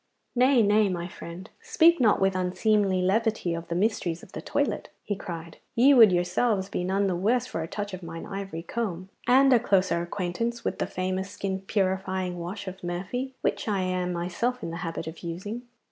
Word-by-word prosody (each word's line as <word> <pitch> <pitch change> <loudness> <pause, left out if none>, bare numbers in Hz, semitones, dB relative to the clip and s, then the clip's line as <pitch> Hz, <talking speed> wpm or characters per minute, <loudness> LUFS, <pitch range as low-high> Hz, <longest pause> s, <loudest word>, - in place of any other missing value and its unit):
'Nay, 250 -1 +5
nay, 210 0 +4
my 175 -1 -3
friend. 175 +2 -9
Speak 345 -8 +4
not 220 -4 +4
with 195 0 +2
unseemly 185 +1 +2
levity 215 -2 +1
of 165 0 -5
the 170 - -3
mysteries 180 -4 0
of - - -14
the - - -6
toilet,' - - -1
he 205 - -2
cried. 170 -4 -7 0.2
'Ye 265 +4 +6
would 225 -6 +8
yourselves 190 +3 +1
be 180 - -2
none 195 +2 +1
the 190 -2 +1
worse 225 +7 +1
for 210 -10 -4
a 160 - -4
touch 205 +2 -5
of 185 - -6
mine 165 -1 -7
ivory 195 -4 -5
comb, 185 -2 -3 0.2
and 270 +2 +6
a 240 - +6
closer 190 -6 +2
acquaintance 195 +7 -3
with - - -2
the - - 0
famous 185 +1 -2
skin 195 -1 -3
purifying 190 -2 -1
wash 190 +4 -6
of 185 0 -7
Murphy 195 +10 -3
which - - -1
I 200 -3 +1
am 185 -1 -1
myself 185 +9 -2
in 165 - -3
the 170 - -5
habit 165 -1 -4
of 160 +1 -7
using. 205 +8 -5
190 Hz, 195 wpm, -27 LUFS, 175-220 Hz, 0.2 s, would